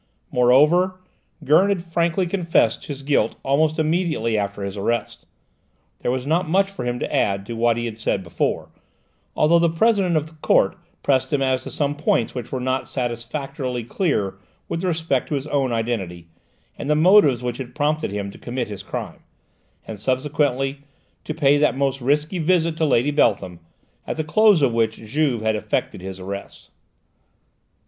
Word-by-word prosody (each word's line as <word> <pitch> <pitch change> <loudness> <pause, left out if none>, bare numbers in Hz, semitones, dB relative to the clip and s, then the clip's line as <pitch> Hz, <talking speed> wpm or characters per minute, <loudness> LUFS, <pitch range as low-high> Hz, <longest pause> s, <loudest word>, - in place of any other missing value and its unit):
Moreover, 150 +10 +4 0.4
Gurn 155 +8 +4
had 190 -4 0
frankly 170 +2 0
confessed 170 - +1
his 140 -2 -6
guilt 135 -6 +1
almost 155 +3 +2
immediately 155 -8 0
after 100 -1 -2
his 100 0 -4
arrest. 115 +4 -3 0.7
There - - -2
was 130 +1 -1
not 165 +3 0
much 195 +3 +2
for 160 -11 -6
him 120 0 -1
to - - -2
add 100 -1 +1
to 115 - -6
what 115 0 +2
he 120 - -2
had 115 -1 -6
said 100 -3 -1
before, 85 - -2 0.6
although 170 +3 +4
the 170 0 +3
President 185 -1 +2
of 150 - 0
the 160 - -14
Court - - +3 0.3
pressed 130 +1 +1
him 140 -2 +1
as 130 -1 +1
to - - -8
some 145 -1 -1
points 145 -6 0
which 125 -3 -4
were 130 - -2
still 125 - -4
not 130 0 -1
satisfactorily 125 +1 -4
clear 110 - -1 0.3
with 165 - -3
respect 160 -7 -1
to 150 - -1
his 140 0 -3
own 140 -4 0
identity, 110 -7 -3 0.5
and 145 - -4
the 150 - +4
motives 155 - +5
which 125 0 -3
had 125 -2 -7
prompted 150 +1 0
him 100 0 -4
to - - -14
commit 120 -2 -4
his 100 -2 -6
crime, - - -6 0.7
and, 110 -2 -8
subsequently, 135 +2 0 0.5
to 155 - -4
pay 145 -2 +4
that 150 -3 +2
most 135 -1 0
risky 150 +7 0
visit 165 0 +2
to 160 - +1
Lady 140 0 +2
Beltham, 100 - +1 0.5
at - - -3
the 155 - -1
close 200 +1 +4
of 125 -4 +3
which 110 -1 +1
Juve 125 +1 -1
had 110 0 +1
effected 105 -3 -2
his 95 0 -7
arrest. 100 +2 -8
135 Hz, 175 wpm, -22 LUFS, 115-155 Hz, 0.7 s, motives